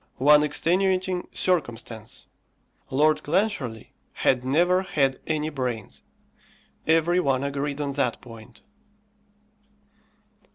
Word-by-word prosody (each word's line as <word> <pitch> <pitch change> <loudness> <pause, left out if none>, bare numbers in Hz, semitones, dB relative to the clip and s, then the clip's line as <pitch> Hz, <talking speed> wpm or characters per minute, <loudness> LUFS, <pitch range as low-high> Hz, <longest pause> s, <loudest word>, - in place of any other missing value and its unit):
One 150 +3 +6
extenuating 185 +4 0
circumstance: 120 - -2 0.6
Lord 155 +3 +2
Clancharlie 150 - -1 0.2
had 125 -1 +1
never 175 +8 +2
had 140 -8 0
any 155 0 -1
brains. 125 -6 -4 0.9
Every 165 +2 +3
one 135 -5 +1
agreed 140 +1 -3
on 145 -1 -2
that 135 -4 -1
point. 115 -1 -14
145 Hz, 90 wpm, -25 LUFS, 130-175 Hz, 0.9 s, One